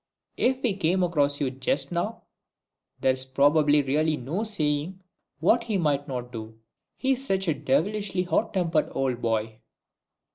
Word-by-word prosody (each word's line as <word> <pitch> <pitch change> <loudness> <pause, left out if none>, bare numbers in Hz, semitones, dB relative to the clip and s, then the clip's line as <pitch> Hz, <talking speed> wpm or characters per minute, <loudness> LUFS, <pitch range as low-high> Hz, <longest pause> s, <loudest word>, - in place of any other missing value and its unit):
If 260 +1 +1
he 225 -6 +1
came 185 0 +1
across 145 -5 +1
you 135 -3 0
just 135 +2 -1
now, 190 +7 -2 0.8
there's 130 0 +1
really 150 +1 +3
no 150 - -3
saying 165 -4 -1 0.4
what 230 +9 +3
he 215 -4 0
mightn't 140 -6 -1
do. 110 -1 -8 0.4
He's 265 0 0
such 195 -7 0
a 160 - +3
devilishly 180 +7 0
hot 185 +5 0
tempered 170 -4 +1
old 130 -3 -1
boy!" 110 -1 -1
155 Hz, 135 wpm, -26 LUFS, 135-190 Hz, 0.8 s, really